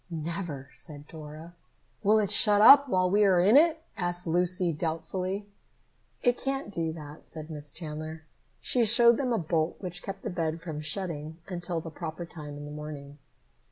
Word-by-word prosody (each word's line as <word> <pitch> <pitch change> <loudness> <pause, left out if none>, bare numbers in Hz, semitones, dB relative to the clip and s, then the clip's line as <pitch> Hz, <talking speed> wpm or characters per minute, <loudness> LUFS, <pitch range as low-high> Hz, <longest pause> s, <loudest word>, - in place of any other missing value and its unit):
"Never," 160 -4 -5
said 150 -3 -9
Dora. 155 +2 -10 0.5
"Will 215 +1 +4
it 205 -2 +1
shut 210 -1 +6
up 280 +6 +8
while 185 -3 +2
we 210 +2 +4
are 190 -3 +4
in 200 +7 +5
it?" 320 +2 +4
asked 175 0 -2
Lucy 180 +1 +1
doubtfully. 180 +5 -3 0.8
"It 245 0 +2
can't 270 -5 -3
do 165 -4 -2
that," 150 -2 -11
said 160 0 -8
Miss 150 -1 -5
Chandler. 155 0 -6 0.4
She 245 - +3
showed 235 +1 +7
them 260 -3 -1
a 230 - +2
bolt 160 -2 -1
which 180 -2 -5
kept 195 0 -7
the - - -3
bed 165 -2 -2
from 160 -3 -6
shutting 155 -1 -5
until 175 -2 -4
the 165 - -8
proper 160 +2 -6
time 150 -3 -9
in 145 - -8
the 145 - -8
morning. 150 -1 -8
170 Hz, 175 wpm, -28 LUFS, 155-195 Hz, 0.8 s, up